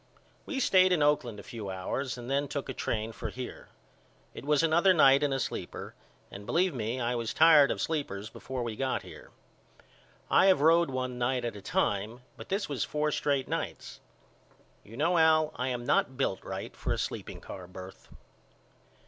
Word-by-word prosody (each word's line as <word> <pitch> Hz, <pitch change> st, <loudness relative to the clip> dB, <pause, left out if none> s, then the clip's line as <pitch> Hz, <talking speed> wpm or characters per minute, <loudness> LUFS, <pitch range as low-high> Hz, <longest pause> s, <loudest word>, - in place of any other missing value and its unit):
We 275 Hz, -, -2 dB
stayed 185 Hz, -6 st, +4 dB
in 165 Hz, -5 st, +3 dB
Oakland 140 Hz, -7 st, +1 dB
a -, -, -10 dB
few 110 Hz, -5 st, -7 dB
hours 110 Hz, +8 st, -3 dB
and 120 Hz, -1 st, -8 dB
then 140 Hz, +2 st, 0 dB
took 140 Hz, 0 st, -4 dB
a -, -, -3 dB
train 110 Hz, -2 st, -2 dB
for -, -, -6 dB
here. 125 Hz, -1 st, -8 dB, 0.6 s
It -, -, -9 dB
was 150 Hz, +2 st, +2 dB
another 170 Hz, +4 st, +4 dB
night 135 Hz, -3 st, +6 dB
in 145 Hz, -1 st, +1 dB
a 135 Hz, -, 0 dB
sleeper -, -, -5 dB, 0.4 s
and 100 Hz, -, -9 dB
believe 180 Hz, 0 st, +2 dB
me 120 Hz, 0 st, -3 dB
I 120 Hz, 0 st, 0 dB
was 115 Hz, -2 st, -3 dB
tired 155 Hz, -3 st, +7 dB
of -, -, -2 dB
sleepers 125 Hz, -11 st, -3 dB
before 130 Hz, +3 st, -6 dB
we 115 Hz, -2 st, -4 dB
got 130 Hz, +2 st, -1 dB
here. -, -, -12 dB, 1.0 s
I -, -, +5 dB
have 190 Hz, -6 st, +5 dB
road 165 Hz, +1 st, +5 dB
one 130 Hz, -1 st, -3 dB
night 125 Hz, 0 st, 0 dB
at 115 Hz, -, -3 dB
a 100 Hz, -, -9 dB
time 105 Hz, +5 st, -1 dB
but -, -, -11 dB
this 200 Hz, +2 st, -1 dB
was 140 Hz, -4 st, -2 dB
four 150 Hz, 0 st, -1 dB
straight 140 Hz, -2 st, 0 dB
nights. -, -, -5 dB, 0.8 s
You 115 Hz, +3 st, -12 dB
know 165 Hz, +4 st, +2 dB
Al 155 Hz, -1 st, +4 dB
I 125 Hz, +2 st, -2 dB
am 120 Hz, -2 st, -3 dB
not 130 Hz, +2 st, +1 dB
built 130 Hz, -8 st, -1 dB
right -, -, -6 dB
for -, -, -3 dB
a -, -, 0 dB
sleeping -, -, -4 dB
car 90 Hz, -1 st, -9 dB
birth. 95 Hz, +1 st, -11 dB
130 Hz, 190 wpm, -29 LUFS, 115-155 Hz, 1.0 s, tired